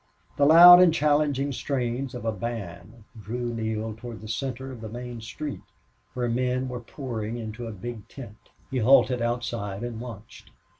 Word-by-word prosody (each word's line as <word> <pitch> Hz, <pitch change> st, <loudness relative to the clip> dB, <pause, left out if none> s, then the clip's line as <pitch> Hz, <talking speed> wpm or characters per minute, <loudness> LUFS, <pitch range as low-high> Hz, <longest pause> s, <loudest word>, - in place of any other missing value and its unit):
The 140 Hz, -, +3 dB
loud 175 Hz, +3 st, +10 dB
and 180 Hz, -2 st, +6 dB
challenging 145 Hz, -3 st, +1 dB
strains 130 Hz, -1 st, -3 dB
of 120 Hz, -, -7 dB
a 115 Hz, -, +1 dB
band 110 Hz, 0 st, -7 dB, 0.2 s
drew 120 Hz, +4 st, -4 dB
Neale 110 Hz, -1 st, -3 dB
toward 115 Hz, -1 st, -9 dB
the 110 Hz, -, -9 dB
center 130 Hz, +3 st, -4 dB
of 120 Hz, -3 st, -10 dB
the 110 Hz, -, -6 dB
main 120 Hz, 0 st, -7 dB
street, 140 Hz, +6 st, -6 dB, 0.5 s
where 125 Hz, -1 st, -1 dB
men 125 Hz, +2 st, -1 dB
were 125 Hz, -1 st, -5 dB
pouring 120 Hz, -3 st, -5 dB
into 115 Hz, +1 st, -6 dB
a -, -, -5 dB
big 110 Hz, +2 st, -8 dB
tent. 115 Hz, -6 st, -12 dB, 0.2 s
He 130 Hz, -, -1 dB
halted 125 Hz, +1 st, +4 dB
outside 115 Hz, -4 st, -3 dB
and 120 Hz, -2 st, -5 dB
watched. 115 Hz, -3 st, -11 dB
120 Hz, 165 wpm, -26 LUFS, 110-130 Hz, 0.5 s, loud